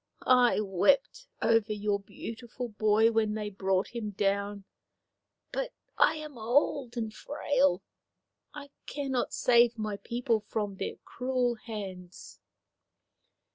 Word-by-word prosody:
I 250 -3 +5
wept 275 - +2 0.2
over 225 -1 +3
your 205 -1 0
beautiful 235 +4 -7
boy 215 +1 +3
when 220 -1 +1
they 210 -1 -3
brought 190 0 0
him 230 -3 -4
down. 200 0 -1 0.9
But - - -3 0.2
I - - +4
am 305 -5 -8
old 245 +1 +1
and 220 -2 -2
frail. 280 -9 +1 0.7
I 290 -2 -10 0.2
cannot 270 -4 -2
save 240 -1 +4
my 215 -2 -3
people 235 +2 0
from 205 -1 -4
their - - -3
cruel 250 -1 0
hands." 195 -6 -8
225 Hz, 115 wpm, -30 LUFS, 205-250 Hz, 0.9 s, I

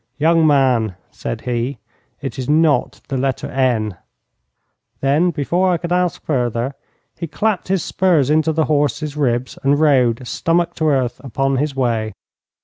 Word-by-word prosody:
'Young 160 +1 +4
man,' 130 -8 +2 0.2
said - - -5
he, 125 +2 -2 0.4
'it 135 -3 -5
is 130 - -4
not 150 -4 +2
the 135 - -1
letter 135 -1 -1
N.' 115 -7 0 1.0
Then 145 +6 +2
before 175 +4 0
I 175 - +2
could 170 +1 -6
ask 180 -1 0
further 125 -2 -1 0.5
he 170 - -3
clapped 210 +3 -1
his 190 -2 0
spurs 165 -7 +2
into 155 +1 +3
his 160 0 +1
horses 150 0 0
ribs 130 -4 -1
and 140 +1 +2
rode, 130 -5 +3
stomach 170 +4 0
to 160 - +1
earth, 130 -5 0
upon 135 +1 0
his 145 0 -1
way. 115 -4 0
140 Hz, 150 wpm, -19 LUFS, 125-160 Hz, 1.0 s, Young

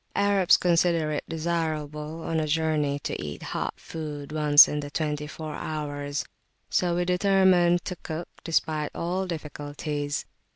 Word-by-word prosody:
Arabs 200 -2 +4
consider 170 -3 +2
it 150 - -2
desirable 155 -1 -3
on 165 -1 -1
a 155 - -1
journey 150 -2 +1
to 145 - -4
eat 75 -1 -6
hot - - -3
food 150 -3 -6
once 150 -1 +8
in 150 - -2
the 145 -1 -5
twenty 150 0 -2
four 155 0 -6
hours; 145 -2 -4 0.5
so 175 -1 +2
we 175 0 0
determine 180 -1 +4
to 180 - -4
cook, 160 +2 -6 0.2
despite 155 -2 0
all 185 +3 -2
difficulties. 145 -2 -4
155 Hz, 140 wpm, -26 LUFS, 150-170 Hz, 0.5 s, once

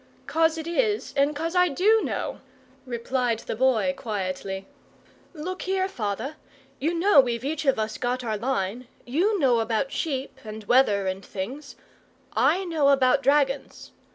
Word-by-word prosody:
"'Cos 325 0 +2
it 320 - -5
IS, 420 +5 0
and 285 +1 +2
'cos 325 +3 -2
I 360 0 +4
DO 420 +9 +3
know," - - -3 0.5
replied 240 0 -1
the - - -4
Boy, 220 -6 +2
quietly. 190 -2 -4 0.7
"Look 365 +5 -5
here, 380 0 0
father, 240 - -4 0.4
you 320 +5 0
know 345 -2 +5
we've 240 -2 +2
each 310 +2 -2
of 270 - +3
us 220 0 -3
got 250 +1 -1
our 220 -2 -1
line. 230 0 -2 0.2
YOU 360 - +1
know 255 -8 +3
about 230 +4 -1
sheep, 270 -4 -3
and 215 0 -8
weather, 210 -4 +3
and 190 +1 -3
things; 245 +10 -6 0.6
I 380 +2 +2
know 315 -5 +2
about 270 0 +4
dragons. 280 -1 0
270 Hz, 155 wpm, -25 LUFS, 225-320 Hz, 0.7 s, know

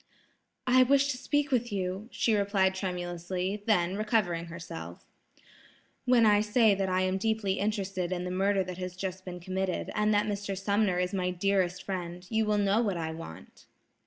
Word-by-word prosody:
"I 255 0 +5
wish 280 +2 +4
to 255 - -4
speak 290 0 0
with 240 -2 +1
you," 190 +1 -3
she 225 - +1
replied 200 -2 +2
tremulously; 180 +1 -3
then, 180 -4 +2
recovering 210 -6 0
herself: 85 - -8 1.0
"When 245 -2 +5
I 205 -1 +5
say 215 0 +4
that 195 -1 -1
I 185 0 +1
am 185 +1 0
deeply 220 -2 0
interested 195 -3 -2
in 180 -1 -2
the 180 - -3
murder 195 +1 +2
that 185 0 -7
has 180 -1 -5
just 185 0 -5
been 180 -1 -6
committed, 185 +1 -2
and 210 0 +2
that 205 0 +3
Mr. 200 -2 -3
Sumner 200 -1 +1
is 180 +1 -1
my 180 -2 0
dearest 180 0 0
friend, 180 -2 -5
you 220 -1 +1
will 210 0 +2
know 205 +2 +3
what 200 -6 0
I 160 -1 -3
want." 160 - -10
190 Hz, 180 wpm, -29 LUFS, 180-210 Hz, 1.0 s, I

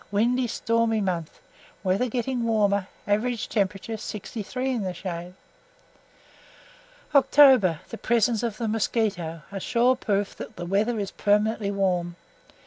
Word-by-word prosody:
Windy 240 +5 +2
stormy 230 -1 +1
month; 175 -5 -3 0.4
weather 195 +6 +1
getting 245 +1 -2
warmer. 205 -4 +1 0.2
Average 220 +3 0
temperature, 205 +1 -1
63 225 +5 -4
in 245 -4 -1
the 185 -2 -3
shade. 175 0 -6 1.8
OCTOBER 265 - +6
The 230 - -7
presence 235 -1 +2
of 230 -3 -3
the 230 - -2
mosquito, 200 -7 -1
a 195 - -4
sure 245 +6 +2
proof 205 -5 -1
that - - -8
the 175 - -6
weather 210 +6 +1
is 200 -2 -3
permanently 210 0 +1
warm. 180 -3 0
210 Hz, 130 wpm, -25 LUFS, 195-235 Hz, 1.8 s, OCTOBER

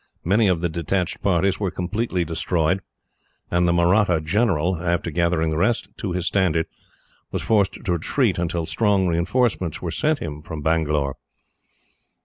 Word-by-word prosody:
Many 105 +5 +3
of 90 -3 +1
the 85 - +1
detached 85 +2 -2
parties 95 0 +1
were 100 -3 0
completely 90 +1 -2
destroyed; 85 +2 0 0.7
and 85 0 +2
the - - +3
Mahratta 85 +1 +3
general, 90 -1 +1
after 85 0 -1
gathering 85 -1 +1
the 75 - -1
rest 100 0 +1
to 95 -4 -3
his 90 -1 -2
standard, 85 -4 +1 0.7
was - - -3
forced 105 -4 +2
to 95 - 0
retreat, 95 - 0
until 85 -1 -1
strong 100 +1 +2
reinforcements 90 - 0
were - - -4
sent 155 0 +1
him 75 - -6
from 75 -1 -7
Bangalore. 75 -4 0
85 Hz, 150 wpm, -23 LUFS, 80-100 Hz, 0.7 s, Many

